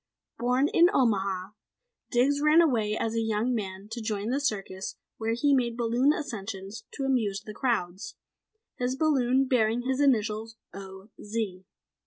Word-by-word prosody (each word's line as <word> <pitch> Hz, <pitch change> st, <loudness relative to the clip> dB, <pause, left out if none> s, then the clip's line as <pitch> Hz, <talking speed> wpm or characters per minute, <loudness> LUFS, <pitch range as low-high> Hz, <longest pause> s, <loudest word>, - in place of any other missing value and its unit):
Born 250 Hz, +4 st, +2 dB
in 340 Hz, +3 st, +5 dB
Omaha, 195 Hz, -6 st, +1 dB, 0.6 s
Diggs 275 Hz, +4 st, +2 dB
ran 305 Hz, +2 st, +5 dB
away 225 Hz, -10 st, +2 dB
as 225 Hz, -, -1 dB
a 230 Hz, -, 0 dB
young 220 Hz, +2 st, 0 dB
man 195 Hz, -3 st, -4 dB
to 235 Hz, +1 st, -4 dB
join 215 Hz, +1 st, -2 dB
a 275 Hz, -, +1 dB
circus 195 Hz, -7 st, -3 dB, 0.2 s
where 225 Hz, 0 st, 0 dB
he 285 Hz, +4 st, +2 dB
made 240 Hz, -3 st, +1 dB
balloon 240 Hz, +4 st, +3 dB
ascensions 205 Hz, -7 st, -5 dB
to 275 Hz, -, -4 dB
amuse 220 Hz, -7 st, 0 dB
the 215 Hz, +1 st, -9 dB
crowds, 205 Hz, -, -2 dB, 0.6 s
his 250 Hz, +1 st, -1 dB
balloon 270 Hz, -3 st, +2 dB
bearing 240 Hz, -2 st, +1 dB
his 260 Hz, +1 st, -1 dB
initials 225 Hz, -4 st, +1 dB, 0.2 s
O. 190 Hz, +1 st, -10 dB
Z. 205 Hz, -4 st, -4 dB
230 Hz, 150 wpm, -28 LUFS, 205-260 Hz, 0.6 s, in